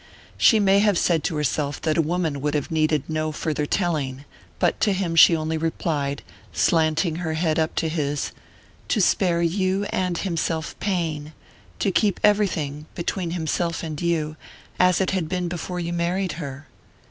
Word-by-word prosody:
She 225 - +5
may 200 -1 +4
have 205 -3 +3
said 165 -3 +2
to 170 - -1
herself 145 -1 -1
that 155 -1 +1
a 165 - +4
woman 160 -3 -1
would 150 +1 -1
have 150 - -2
needed 155 -2 +2
no 155 0 -1
farther 150 -1 -2
telling; 145 -8 -1 0.3
but - - +1
to 210 -2 +3
him 185 -3 -1
she 165 +1 +8
only 160 0 -2
replied, 150 -3 -2 0.3
slanting 160 0 +2
her 160 -2 -2
head 160 -1 +1
up 160 0 0
to 165 - 0
his: 145 -3 -2 0.6
"To 220 - +1
spare 175 -3 +2
you 185 +3 +1
and 180 -2 -1
himself 165 -3 -2
pain 160 -6 -2 0.4
to 195 - +1
keep 200 +1 +1
everything, 160 -8 +1
between 175 0 -2
himself 170 0 -2
and 155 -2 -5
you, 160 -3 -1 0.4
as 180 0 +4
it 190 - +1
had 180 -5 -1
been 180 -1 -1
before 180 +1 -4
you 170 0 -3
married 175 +2 0
her." 145 -3 -7
165 Hz, 170 wpm, -23 LUFS, 155-180 Hz, 0.6 s, she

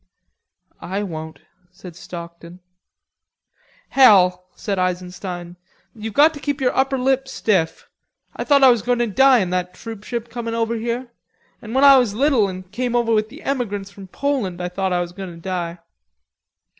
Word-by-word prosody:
"I 195 +3 -3
won't" 160 -5 -7 0.3
said 180 -2 -12
Stockton. 170 0 -10 1.3
"Hell," 180 -8 +5
said 200 -3 -3
Eisenstein. 180 -1 -4 0.4
"You've 220 -1 -7
got 310 +3 +6
to 290 - -9
keep 285 0 -3
your 255 -2 0
upper 270 0 +1
lip 265 +1 +1
stiff. 190 -10 -1 0.5
I - - -3
thought 280 -2 +4
I 260 - +9
was 235 -3 +1
goin' 245 +2 0
to 240 - +1
die 255 +2 +4
in 180 -2 -2
that 180 0 -2
troopship 225 +2 -6
coming 230 -1 -5
over 230 0 0
here. 235 +2 -3 0.5
An' 225 +2 -7
when 265 - +3
I 275 -1 +9
was 225 -5 0
little 255 -5 +3
an' 185 0 -7
came 240 +6 -3
over 235 -1 +2
with 215 0 +1
the 285 +7 -13
emigrants 205 -7 -3
from 200 -1 -12
Poland, 235 -6 -2
I 180 0 -3
thought 190 +1 -2
I 175 0 +1
was 175 -1 -5
goin' 190 +1 -7
to 170 - -11
die. 175 -1 -4
210 Hz, 170 wpm, -21 LUFS, 180-250 Hz, 1.3 s, I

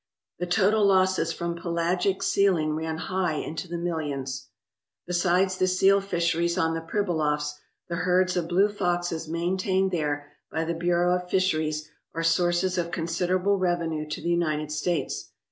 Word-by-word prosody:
The 180 - -2
total 205 +4 +3
losses 185 -3 +3
from 170 0 -3
pelagic 175 +3 0
sealing 180 -8 +2
ran 160 +1 -3
high 185 -1 -1
into 160 +4 -4
the 170 0 -4
millions. 145 -6 -3 0.6
Besides 185 +1 +1
the 185 - +3
seal 195 +2 +4
fisheries 170 -2 0
on 165 -3 +2
the 165 - -2
Pribilofs, 160 -5 0 0.4
the 170 - -3
herds 180 +1 +2
of 175 -2 -1
blue 190 +4 +4
foxes 175 -5 -2
maintained 185 +3 0
there 145 -4 -2 0.2
by 160 - -1
the 165 +1 -1
Bureau 175 +1 +2
of 180 0 -4
Fisheries 155 -5 0 0.3
are 165 - -1
sources 175 +2 +2
of 170 -1 -1
considerable 180 +4 0
revenue 165 -4 -1
to - - -4
the 170 - -2
United 155 -3 0
States. 160 +3 -2
175 Hz, 150 wpm, -26 LUFS, 160-185 Hz, 0.6 s, seal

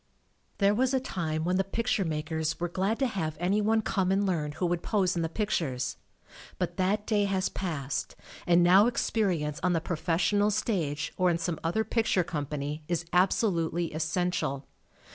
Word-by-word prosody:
There 200 0 +4
was 260 +4 +1
a - - +3
time 160 -9 -3
when 180 +1 +1
the 195 - +2
picture 225 +1 0
makers 160 0 -2
were 175 - -1
glad 190 +5 -1
to 270 - +1
have 160 - -2
any 190 +4 +1
one 220 +1 +2
come 190 -3 0
and 200 +1 +2
learn 155 -6 -1
who 180 - -2
would 175 -1 0
pose 190 -4 +1
in 170 - 0
the 165 - -1
pictures, 160 - -2 0.6
but - - -3
that 200 +3 +1
day 205 -2 +2
has 195 -1 0
passed, 150 -7 -3 0.3
and 175 0 +5
now 190 +5 +6
ex 245 - 0
perience 170 -9 0
on 180 0 +2
the 165 - +2
professional 180 +5 +1
stage 175 -9 -1
or 185 -1 +3
in 170 - +2
some 170 -1 -3
other 175 +7 +1
picture 220 -5 +1
company 150 -2 -4
is 175 -1 -1
absolutely 175 -3 +1
essential. 160 -3 -1
180 Hz, 180 wpm, -28 LUFS, 160-200 Hz, 0.6 s, now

